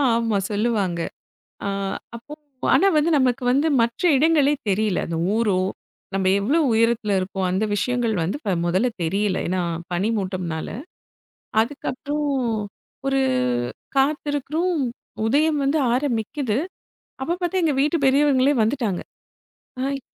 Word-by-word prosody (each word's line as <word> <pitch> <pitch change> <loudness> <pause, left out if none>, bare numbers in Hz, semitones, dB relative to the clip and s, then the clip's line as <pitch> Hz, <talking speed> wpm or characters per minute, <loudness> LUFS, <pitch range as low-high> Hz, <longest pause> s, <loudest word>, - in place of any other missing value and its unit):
ஆமா, 230 -3 +1
சொல்லுவாங்க. 205 -5 0 0.7
அ, - - 0 0.5
அப்போ 240 +6 -12 0.4
ஆனா 395 - +5
வந்து 305 +2 +3
நமக்கு 255 -1 +1
வந்து 280 +5 +3
மற்ற 235 0 -2
இடங்களே 295 0 +4
தெரியல. 200 -1 +1
அந்த 165 - -3 0.2
ஊரோ, 220 -4 +2 0.6
நம்ம 195 -1 0
எவ்வளவு 285 +8 +2
உயரத்துல 225 -2 +2
இருக்கோம். 190 0 -2
அந்த 190 +4 +1
விஷயங்கள் 240 +1 0
ப - - 0
வந்து 190 - -2 0.3
முதல்ல 185 +8 +2
தெரியல, 195 +3 0
ஏன்னா 185 +1 0 0.3
பனி 180 +5 0
மூட்டம்னால. 185 -5 -3 0.9
அதுக்கப்புறம் 290 +3 -3 0.8
ஒரு 270 0 +2 0.8
காத்து 290 +2 +2
இருக்குறோம் 310 +6 -1 0.5
உதயம் 295 +5 +2
வந்து 280 +3 +2 0.2
ஆரம்பிக்குது. 245 -2 -1 0.6
அப்போ, 325 +6 0
பாத்தா 360 +2 0
எங்க 315 -3 +2
வீட்டு 300 +4 +2
பெரியவங்களே 275 0 +4
வந்துட்டாங்க. 220 -5 0 0.8
ஹைய் 275 +1 -1
245 Hz, 120 wpm, -23 LUFS, 205-290 Hz, 0.9 s, ஆனா